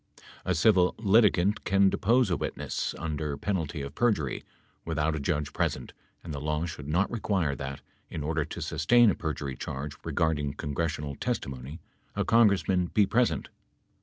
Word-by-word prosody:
A 90 - +1
civil 90 +1 +4
litigant 105 -2 +3
can 95 0 +4
depose 120 0 +2
a - - +3
witness, - - -3
under 75 -3 -3
penalty 80 -7 -2
of 70 0 -7
perjury, 100 - 0 0.4
without 80 -1 0
a - - -3
judge 75 +1 -2
present - - -2 0.3
and 80 - -6
the 70 - -5
law 75 +2 -1
should 75 -4 -7
not 90 +6 +1
require 95 -10 0
that, 70 0 -6 0.3
in 75 - -5
order 80 +1 0
to 80 +3 -7
sustain 100 +10 +4
a - - -2
perjury 70 -5 -4
charge 70 +4 -5
regarding 75 -2 0
congres 75 +2 -2
sional 70 -2 -6
testimony, 70 +4 -4 0.3
a - - 0
Congressman 100 -5 +3
be 105 +3 +3
present. 120 +5 +1
80 Hz, 160 wpm, -28 LUFS, 75-95 Hz, 0.4 s, civil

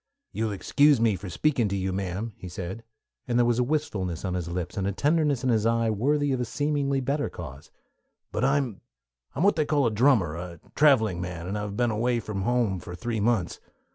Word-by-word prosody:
"You 115 - -2
will 110 - -1
excuse 145 +7 +3
me 110 -3 +3
for 95 +1 -7
speaking 130 - +1
to 100 - -2
you, 95 -1 -1
ma'am," 100 +4 -3
he 90 - -9
said, 95 +5 -6 0.4
and 120 -1 +1
there 120 - +4
was 120 0 +2
a - - +4
wistful 140 -7 -1
smile 95 - -5
on - - -2
his 90 -2 -3
lips 90 +1 -4
and 95 -1 -1
a - - +1
tenderness 145 - +1
in 130 - +2
his 110 -2 +2
eye 115 -1 +2
worthy 145 +7 +1
of 130 -2 0
a - - 0
seemingly 140 0 0
better 140 +3 -1
cause, 70 -5 -9 0.6
"but 105 - -2
I'm 135 -6 +1 0.5
I'm 155 - 0
what 200 - +4
they 155 - +2
call 145 -3 +2
a 115 - +2
drummer, 110 - +3
a 85 -1 -7
traveling 110 - +4
man, 90 -2 -5
and 95 +3 -3
I've 105 -1 -4
been 120 -2 +2
away 120 +3 +1
from 105 -3 -4
home 115 -3 +1
for 90 - -8
three 110 +5 -3
months. 105 -4 0
115 Hz, 225 wpm, -26 LUFS, 95-135 Hz, 0.6 s, there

